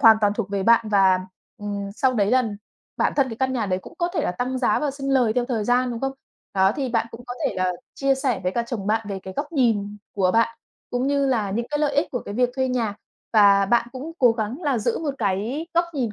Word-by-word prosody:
hoàn 225 -1 +8
toàn 205 -1 +3
thuộc 210 -3 -3
về 200 -1 -1
bạn 230 +1 +4
và, 190 -3 +4 0.4
ừm, 200 -1 -4
sau 260 +3 +2
đấy 205 -3 +2
là 255 0 +4 0.5
bản - - +1
thân 275 -2 +3
cái 225 - -6
căn 260 +2 0
nhà 235 -5 -1
đấy 185 -1 0
cũng - - -13
có 345 -1 +1
thể - - +1
là - - 0
tăng 250 +7 -2
giá 250 - +2
và 295 - 0
sinh 275 0 -4
lời 250 -5 +3
theo 245 +1 +1
thời 235 -4 -2
gian, 245 +2 +2
đúng 235 -1 -5
không? 270 0 -1 0.4
Đó, 190 0 +4
thì 270 -2 -1
bạn 230 -1 0
cũng 230 +1 -10
có 245 - -5
thể - - -2
là 185 0 +1 0.2
chia 275 0 +2
sẻ 265 -6 -1
với 180 0 -1
cả 235 - 0
chồng 225 -5 -4
bạn 220 0 0
về 195 -1 -3
cái 190 - -8
góc 295 +3 -3
nhìn 215 -7 +1 0.2
của 185 -2 +3
bạn, 230 0 +2 0.3
cũng 245 +2 0
như 280 0 +2
là 225 -7 0
những 235 +4 -2
cái 295 - 0
lợi 295 -2 +1
ích 290 - +2
của 245 - -2
cái 200 - -6
việc 245 +2 +2
thuê 260 0 +1
nhà. 230 -5 -1 0.4
Và 200 -2 +6
bạn 235 +2 +2
cũng 275 +5 -6
cố 245 -3 +5
gắng 230 +8 -4
là 280 -5 +1
giữ 210 - 0
1 295 -4 -3
cái 220 - -1
góc 340 +1 +4
nhìn 240 -7 -1
235 Hz, 270 wpm, -23 LUFS, 205-265 Hz, 0.5 s, hoàn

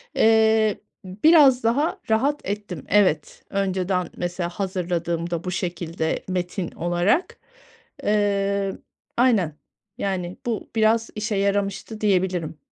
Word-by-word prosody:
eee, 220 -1 +4 0.3
ı 185 +1 -9
biraz 290 -6 +7
daha 270 +8 +1
rahat 275 +7 +2
ettim. 200 -6 -5
Evet, 185 -7 +2
önceden 190 -2 -1
mesela 175 0 -2
hazırladığımda 175 -2 -2
bu 180 - -3
şekilde 170 -2 -3
metin 180 0 -2
olarak. 175 - 0 0.7
Eee, 200 -1 +1 0.4
aynen, 210 - +2 0.4
yani, 185 -2 -3
bu 230 -3 -3
biraz 225 +1 +3
işe 215 0 -2
yaramıştı, 200 +2 -1
diyebilirim. 185 -6 0
195 Hz, 105 wpm, -23 LUFS, 175-220 Hz, 0.7 s, biraz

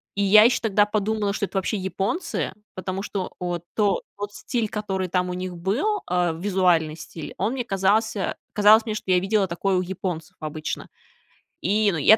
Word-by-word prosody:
и 200 - +1
я 210 +2 +8
ещё 240 +1 +4
тогда 210 -2 +3
подумала, 210 0 0
что 200 - -1
это 195 - -5
вообще 190 +2 0
японцы. 195 - -2 0.2
Потому 185 +1 -4
что, 195 -3 -3
вот 175 -1 -3
то 205 -3 +2 0.2
тот 205 0 -5
стиль, 230 -4 -2
который 195 -3 -2
там 180 0 0
у - - -2
них 185 0 -4
был, 250 - 0
а, 175 -2 +1
визуальный 175 -3 +2
стиль, 160 -1 -8
он 210 +7 0
мне 255 -2 -2
казался 200 +1 +1 0.2
казалось 215 +2 +6
мне, 215 -1 -2
что 190 - -3
я 180 - +5
видела 195 +1 +1
такое 185 +2 0
у - - +2
японцев 180 -3 -4
обычно. 155 0 -4 0.7
И, 205 +2 +2
ну, 165 - -2
я 215 +9 +7
195 Hz, 185 wpm, -24 LUFS, 180-210 Hz, 0.7 s, я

